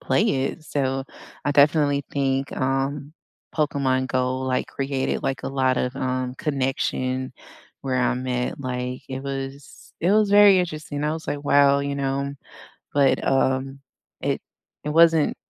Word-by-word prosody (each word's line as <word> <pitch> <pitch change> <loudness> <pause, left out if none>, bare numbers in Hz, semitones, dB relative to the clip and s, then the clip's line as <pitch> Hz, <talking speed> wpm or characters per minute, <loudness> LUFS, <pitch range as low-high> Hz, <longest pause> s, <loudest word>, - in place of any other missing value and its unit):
play - - +2 0.2
it, 160 - -6
so 135 -3 -1 0.4
I 145 - +1
definitely 145 -1 +3
think, 135 0 0
um, 135 +2 -1 0.4
Pokémon 140 -4 0
GO, 130 0 0
like, 130 -1 -1
created, 135 -1 -2
like, 135 - -2
a - - -3
lot 130 -1 +1
of, 125 +1 -1
um, 130 -1 -2
connection 130 -2 -1 0.5
where 130 -2 -2
I'm 125 0 0
at, 125 +2 -2
like, 125 -1 -4
it 130 0 -5
was 135 0 -6
it 180 +4 +3
was 210 -1 +3
very 205 -1 +7
interesting. 155 -4 -4
I 150 +1 0
was 160 0 -6
like, 145 0 -3
"Wow, 140 -1 +5
you 140 0 -3
know" 140 0 -1 0.6
but, 140 -2 +3
um, 135 0 +1 0.4
it - - -1 0.4
it 150 - -2
wasn't 165 -1 +4
135 Hz, 145 wpm, -23 LUFS, 130-145 Hz, 0.6 s, very